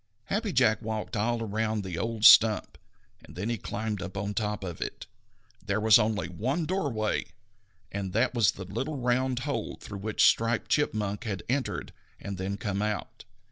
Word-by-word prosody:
Happy 210 0 0
Jack 110 -9 +3
walked 110 -1 -4
all 115 +2 0
around 110 0 -1
the 95 -3 -5
old 115 +4 -1
stump, 110 -1 +7 0.4
and - - -14
then 100 +6 -3
he 120 - -1
climbed 105 -1 -3
up 100 - -6
on 100 +1 -2
top 105 0 -2
of 85 -3 -6
it. - - -5 0.6
There 100 0 0
was 110 +1 +6
only 105 -3 0
one 130 - -2
doorway, 140 - -1 0.7
and 100 -2 -3
that 120 +5 +2
was 115 -6 +4
the 95 - -8
little 130 - -3
round 125 0 0
hole 130 -5 -3
through 100 - -8
which 105 +1 +2
Striped 115 0 +2
Chipmunk 105 -6 0
had 100 -5 -3
entered 125 -8 -2 0.3
and 100 -2 -6
then 100 +2 -3
come 100 -4 -2
out. 105 -1 -3
110 Hz, 175 wpm, -28 LUFS, 100-120 Hz, 0.7 s, stump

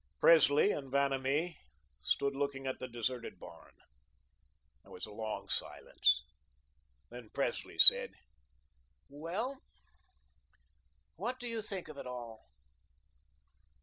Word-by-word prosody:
Presley 160 +3 +6
and 135 -3 -5
Vanamee 140 +4 0 0.4
stood 140 - 0
looking 140 -1 -2
at 130 - -3
the 130 - -5
deserted 120 0 -4
barn. - - -13 1.1
There - - -19
was 90 - -6
a 105 - -12
long 110 0 -5
silence. - - +1 0.9
Then 120 -2 -10
Presley - - -2
said: - - +8 1.0
"Well... 185 - -4 1.6
what 255 +1 -3
do 245 - -5
you 230 -1 -2
think 195 -5 -5
of 155 -2 -9
it - - -7
all?" 120 -3 -8
140 Hz, 110 wpm, -33 LUFS, 125-170 Hz, 1.6 s, said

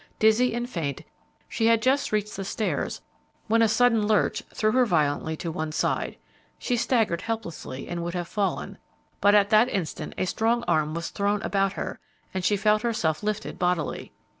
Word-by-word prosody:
Dizzy 220 +3 +3
and 240 0 -2
faint, 160 - -4 0.4
she 225 - 0
had 230 -1 +5
just 265 +4 +1
reached 210 -1 -1
the 195 - -4
stairs 210 +3 -2 0.4
when 230 +1 +3
a 225 - +5
sudden 225 -1 +3
lurch 215 -1 +2
threw 215 0 +1
her 255 +2 +4
violently 160 -5 0
to 165 - -4
one 155 0 -3
side; - - -1 0.4
she 245 - -1
staggered 225 -8 +1
helplessly 170 - -5
and 175 -1 -4
would 175 +1 -4
have 175 -1 -3
fallen, 205 0 -2 0.4
but 205 +1 +5
at 205 +1 +4
that 220 +3 +5
instant 180 -9 -4
a - - 0
strong 230 +5 +1
arm 155 0 +1
was 170 0 -4
thrown 205 0 0
about 195 0 +1
her - - -5 0.3
and 185 -1 -2
she 205 +3 +2
felt 210 +1 +3
herself 170 -10 0
lifted 215 0 -3
bodily. 175 -3 -1
210 Hz, 180 wpm, -26 LUFS, 170-225 Hz, 0.4 s, had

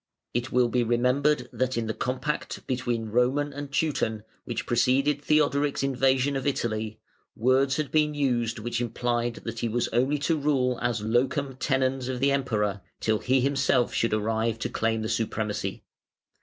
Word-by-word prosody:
It 120 +2 -2
will 125 -1 +4
be 120 +1 +1
remembered 125 +3 +2
that 130 -1 -1
in 115 - 0
the 110 - -2
compact 130 +6 -3
between 120 -3 -2
Roman 130 +6 +1
and 145 0 -6
Teuton, 120 -8 0 0.2
which - - -3
preceded 135 +4 +2
Theodoric's 145 -2 +2
invasion 135 +1 +2
of 135 0 -2
Italy, 110 -5 -2 0.4
words 130 +4 +3
had 150 -3 -2
been 150 -1 +2
used 120 -5 0
which 120 +2 -3
implied 120 0 -1
that 115 0 -5
he 115 - -1
was 120 +2 0
only 130 +5 +1
to 155 +3 0
rule 130 -4 +1
as 120 -2 0
"locum 130 +5 0
tenens" 130 -1 0
of 130 -1 -3
the 140 +2 +3
Emperor 105 -7 0 0.2
till 110 -1 +1
he 130 0 +2
himself 135 -2 +2
should 115 - +1
arrive 110 +1 0
to - - -3
claim 110 0 0
the - - -2
supremacy. 105 -3 -2
125 Hz, 165 wpm, -27 LUFS, 115-140 Hz, 0.4 s, will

